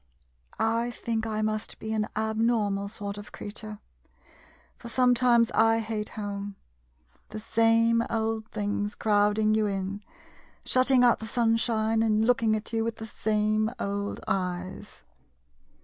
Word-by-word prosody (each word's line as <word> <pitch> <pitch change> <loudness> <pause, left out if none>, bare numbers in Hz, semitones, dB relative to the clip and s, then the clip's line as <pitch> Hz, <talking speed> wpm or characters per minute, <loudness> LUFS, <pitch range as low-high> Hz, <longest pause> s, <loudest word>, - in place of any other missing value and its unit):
I 230 +2 +1
think 225 -2 -3
I 215 -1 -2
must 215 0 -2
be 220 0 -4
an 215 -1 0
abnormal 220 -2 0
sort 205 -1 -6
of 205 - -11
creature 210 +1 -8 0.5
— - - -29
for 235 - -9
sometimes 245 -1 +3
I 225 0 +4
hate 220 -1 -3
home! 200 -1 -5 0.7
The 215 - -6
same 230 +1 +3
old 220 -1 -1
things 205 0 -3
crowd 210 -1 +2
ing 215 0 +3
you 215 -1 +2
in, 195 0 -3 0.6
shutting 255 0 +4
out 240 - +5
the 220 - -6
sunshine, 225 -1 +1
and 220 -1 +2
looking 230 -2 +3
at 215 +2 -5
you 225 0 +1
with 230 0 -2
the 225 - -7
same 215 0 0
old 200 0 -3
eyes 185 -1 -4
220 Hz, 140 wpm, -27 LUFS, 210-225 Hz, 0.7 s, out